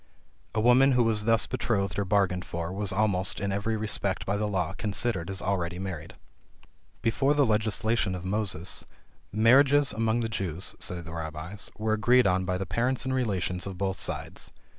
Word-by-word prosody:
A - - +2
woman 125 +4 +5
who 125 -1 +4
was 110 -2 +1
thus 115 0 +3
betrothed 100 -7 -1
or 100 - 0
bargained 95 -2 +1
for, 85 -1 -4
was 100 0 -1
almost 95 -2 +1
in 100 0 -2
every 100 +3 -1
respect 105 -2 -1
by 100 - 0
the 105 +1 -1
law 90 -5 -1
considered 100 -3 -1
as 95 -1 -3
already 90 -3 -1
married. 95 -5 -6 0.9
Before 135 +5 +2
the 145 -1 +4
legislation 110 -2 +1
of 90 0 -7
Moses, 95 -4 -1 0.4
"marriages 135 +6 +5
among 115 +1 +1
the 115 - -1
Jews," 95 -5 -3
say 90 -1 -1
the 80 -1 -9
Rabbies, 80 +4 -5
"were 110 +1 0
agreed 120 +3 +4
on 95 -1 +2
by 90 0 -1
the 95 - -3
parents 120 +8 -1
and 130 - -1
relations 100 -7 -1
of 95 -2 -6
both 95 0 -2
sides. - - -4
100 Hz, 180 wpm, -28 LUFS, 90-115 Hz, 0.9 s, woman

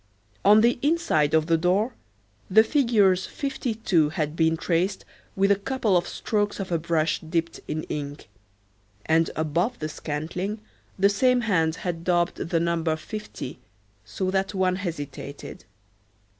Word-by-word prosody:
On 210 +2 +7
the 240 +1 +3
inside 285 - +2
of 160 -1 +3
the 165 0 +3
door 190 +8 +1 0.6
the 220 +3 +7
figures 220 -8 +3
52 220 - 0
had 155 -2 -2
been 160 0 +2
traced 180 +4 -1 0.3
with 195 +1 +3
a - - +6
couple 215 0 0
of 175 0 +2
strokes 205 -1 -1
of 190 -2 -4
a 170 - +1
brush 165 -1 0
dipped 165 +1 -2
in 155 - -3
ink, 145 0 -6 0.8
and 160 0 +3
above 165 +8 0
the 155 - -3
scantling 165 +8 -4 0.4
the 195 +1 +5
same 250 +5 +3
hand 165 -8 +1
had 170 -2 -4
daubed 175 -1 +1
the 165 0 -1
number 165 -1 0
50, 210 - -7 0.4
so 145 - -3
that 195 +1 -1
one 185 -1 +1
hesitated. 145 - -7
180 Hz, 145 wpm, -25 LUFS, 160-205 Hz, 0.8 s, On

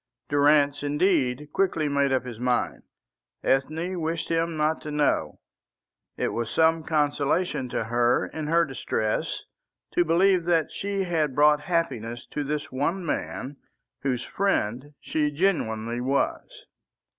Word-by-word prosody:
Durrance, 145 0 +4
indeed, 145 -3 +1
quickly 170 -5 +1
made 140 -1 +1
up 130 -1 +1
his 120 -3 -7
mind. 125 0 0 0.6
Ethne 160 +7 0
wished 165 +1 -2
him 165 0 0
not 155 +1 +1
to 155 - -6
know; 150 -1 0 0.8
it - - 0
was 115 -1 -3
some 160 0 +3
consolation 150 -1 0
to 115 - -1
her 120 +2 +2
in 155 -1 -5
her 170 +2 +3
distress 110 -6 -2 0.5
to 175 - +4
believe 175 +2 +3
that 165 -3 +2
she 200 0 -2
had 155 -6 0
brought 150 0 +5
happiness 130 -9 -2
to 150 - -2
this 145 +1 -3
one 165 +8 -1
man 140 -2 -3 0.4
whose 125 -3 -1
friend 145 - -1
she 150 -1 0
genuinely 120 - 0
was. 135 +2 0
150 Hz, 135 wpm, -26 LUFS, 130-165 Hz, 0.8 s, brought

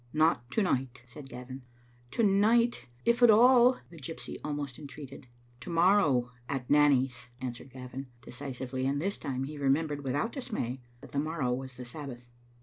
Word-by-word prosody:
"Not 155 -6 +2
to 220 - +2
night," 130 -8 -1
said 135 +2 -11
Gavin. 130 +1 -8 0.5
"To 230 - 0
night, 215 - +3 0.2
if 235 +1 +3
at 240 - +8
all," 245 +3 +7
the 170 - -12
gypsy 165 +3 -6
almost 145 -4 -4
entreated. 140 -2 -10 0.3
"To 180 - -9
morrow, 165 -8 +3 0.2
at 135 -3 -3
Nanny's," 135 -4 +3
answered 125 0 -6
Gavin, 130 +1 -8 0.2
deci 135 +3 -6
sively: 130 +1 -3
and 140 +1 0
this 195 +6 -2
time 130 -1 -3
he 145 +2 -6
remembered 145 +1 +1
without 145 - -1
dismay 135 - -4 0.2
that - - -12
the 140 - -1
morrow 150 -5 -1
was 130 0 -5
the 125 - -7
Sabbath. 125 -2 -8
140 Hz, 165 wpm, -30 LUFS, 130-170 Hz, 0.5 s, at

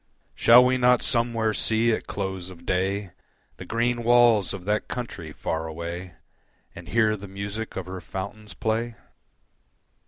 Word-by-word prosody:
Shall 120 +2 +7
we 130 0 +2
not 125 0 +4
somewhere 115 -3 +1
see 115 +2 +2
at - - -3
close 95 -2 -4
of 85 -2 -13
day 95 +2 -1 0.5
The - - -8
green 120 +1 0
walls 120 -3 +5
of 95 -3 -6
that 105 +1 0
country 115 -10 -6
far 80 +2 -3
away, 85 +2 -6 0.6
And - - -11
hear 110 -2 +3
the 100 -1 -9
music 100 +3 -5
of 95 - -4
her 90 0 -7
fountains 100 +3 -7
play? 115 +1 -1
105 Hz, 150 wpm, -25 LUFS, 95-115 Hz, 0.6 s, Shall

